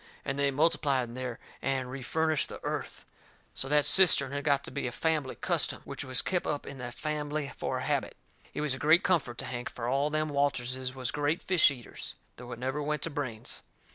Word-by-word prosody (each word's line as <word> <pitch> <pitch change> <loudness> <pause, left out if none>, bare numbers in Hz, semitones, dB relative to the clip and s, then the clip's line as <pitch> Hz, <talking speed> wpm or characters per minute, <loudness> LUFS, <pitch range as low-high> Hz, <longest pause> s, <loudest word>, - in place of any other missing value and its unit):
And 135 +1 -2
they 140 0 +3
multiplied 140 -4 +2
in - - -9
there 125 -1 -4 0.2
and 130 -2 -1
refurnished 155 +3 0
the - - -7
earth. - - -4 0.5
So 135 - -2
that 150 0 +4
cistern 165 -3 +6
had 140 0 -2
got 140 -2 +3
to - - -8
be 140 - -2
a - - -3
fambly 150 -1 0
custom, - - 0
which - - -4
was 130 -1 -1
kep' 180 -2 0
up 145 - -1
in 140 -1 -8
that 120 -1 -6
fambly 150 -1 -2
for - - -2
a - - -3
habit. - - -1 0.4
It - - -1
was 150 -3 +1
a 130 - -4
great 155 +5 +6
comfort 150 -10 +1
to 135 - -4
Hank, 125 -1 -4
fur 120 -1 -5
all 140 +4 +2
them 155 0 0
Walterses 130 -2 0
was 130 -1 -2
great 150 +4 0
fish 185 -5 +6
eaters, 125 -4 -7 0.2
though 125 0 -9
it 120 - -5
never 130 +4 -2
went 150 +1 -1
to 165 - -2
brains. 130 -7 -3
140 Hz, 215 wpm, -30 LUFS, 130-150 Hz, 0.5 s, cistern